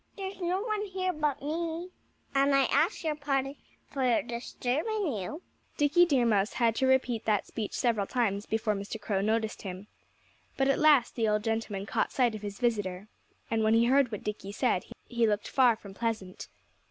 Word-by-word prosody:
There's 385 -1 -6
no 360 +2 0
one 430 -2 -1
here 370 -1 -2
but 300 -4 -1
me. 335 +3 -3 0.4
And 275 0 +3
I 275 - +5
ask 305 +10 +1
your 315 -2 0
pardon 275 -2 -1 0.3
for 255 -4 +1
disturbing 275 - -2
you." 225 - -5 0.3
Dickie 330 +5 +4
Deer 265 -6 +3
Mouse 210 -2 +2
had 235 -2 +2
to 265 - +2
repeat 250 -3 +2
that 210 -2 +1
speech 215 -3 -5
several 220 -5 +1
times 210 -5 -1
before 220 -1 0
Mr. 200 +2 -5
Crow 205 -2 -1
noticed 220 +1 -1
him. 190 0 -7 0.7
But 270 0 +2
at 275 - +2
last 295 -6 +5
the 225 -2 0
old 210 0 +1
gentleman 225 -3 -2
caught - - -1
sight 245 -3 +2
of 215 - -6
his 205 -1 -6
visitor. 205 -5 -1 0.4
And 225 -1 +1
when 220 +1 +4
he 230 +1 +4
heard 265 0 +3
what 210 - -5
Dickie 210 -2 -5
said 215 -5 +1 0.2
he 235 -2 +1
looked 210 -1 0
far 250 -4 +4
from 200 -3 -12
pleasant. 215 -4 -4
235 Hz, 185 wpm, -29 LUFS, 215-290 Hz, 0.7 s, I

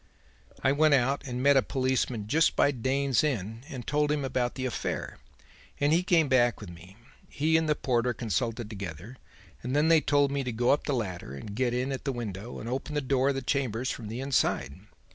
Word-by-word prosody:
"'I 135 - +4
went 150 +1 +4
out 135 +2 +1
and 125 0 -3
met 140 0 +6
a 135 - +6
policeman 130 -4 -1
just 160 +8 +3
by 140 - +4
Dane's 135 +1 +1
Inn 115 -6 -2
and 125 -3 -7
told 150 0 +1
him 145 -2 0
about 125 -2 -1
the 130 - -3
affair, 125 - -4 0.6
and 145 +2 +3
he 170 - +4
came 170 -4 +3
back 120 -2 +3
with 105 -5 -9
me. 90 +3 -14 0.3
He 155 +3 +1
and 160 -1 +2
the 150 - +3
porter 125 -3 0
consulted 115 0 -2
together, 100 - -8 0.4
and 125 +3 -3
then 150 +2 +3
they 165 -2 +6
told 145 -1 +2
me 140 -1 -1
to 125 - -3
go 120 +2 +2
up 145 - +1
the 145 - 0
ladder 90 - -4
and 100 +8 -8
get 120 +2 0
in 130 +2 -1
at 135 - -5
the 140 - 0
window 115 -2 -6
and 115 - -7
open 135 +5 -4
the - - +2
door 135 0 +1
of 140 - 0
the 135 - -3
chambers 130 -2 -1
from 115 - -6
the 115 +3 -5
inside. 135 - 0
130 Hz, 220 wpm, -28 LUFS, 115-140 Hz, 0.6 s, met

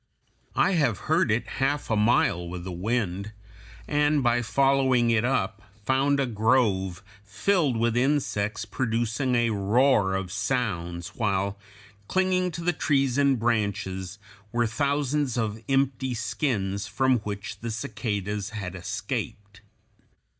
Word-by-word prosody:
I - - +3
have 145 - +2
heard 160 -4 +3
it 115 +2 +1 0.2
half 140 -1 0
a - - +3
mile 105 -5 +2
with 90 0 -6
the 95 - -5
wind, 100 +1 -2 0.5
and 145 -1 +2
by 120 0 +3
following 130 -1 +3
it 115 -1 +2
up 100 -6 0 0.2
found 135 +3 +2
a 135 - +2
grove 105 -6 +1 0.2
filled 130 - +1
with 115 0 +1
insects 120 -6 0
producing 120 +3 -1
a 120 -1 +2
roar 105 0 +3
of 95 -2 -3
sounds, 100 -6 -2
while, 100 -2 -1 0.5
clinging 185 -1 +1
to 170 +1 -5
the 175 +1 +2
trees 140 -3 +1
and 140 -2 +4
branches, 100 -4 -1 0.3
were 120 0 +1
thousands 140 +2 0
of 110 -1 -2
empty 135 -2 +1
skins 105 -4 -2
from 130 +4 +2
which 105 -1 -6
the 115 - -5
cicadas 105 -4 -3
had 100 -5 -5
escaped. 100 +3 -5
115 Hz, 130 wpm, -26 LUFS, 100-135 Hz, 0.5 s, and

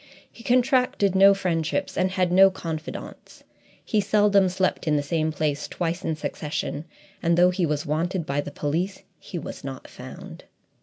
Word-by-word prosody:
He 230 - -15
contracted 250 -5 +2
no 195 +1 +7
friendships 175 -1 -1
and 185 - +1
had 185 -1 0
no 190 +2 +7
confidants. 160 -4 -7 0.4
He 215 - +1
seldom 200 -1 +3
slept 185 -1 -1
in 150 - +3
the 145 - +1
same 160 +1 0
place 150 -2 -2
twice 175 +1 -3
in 160 - -1
succession, 150 0 -4 0.4
and 170 0 +2
though 180 +1 +6
he 180 -2 0
was 150 0 -2
wanted 165 +3 -1
by 140 0 -1
the 145 - -7
police, 160 +7 -3 0.2
he 180 - -7
was 160 - -7
not 135 -1 -7
found. - - -11
175 Hz, 165 wpm, -25 LUFS, 155-195 Hz, 0.4 s, no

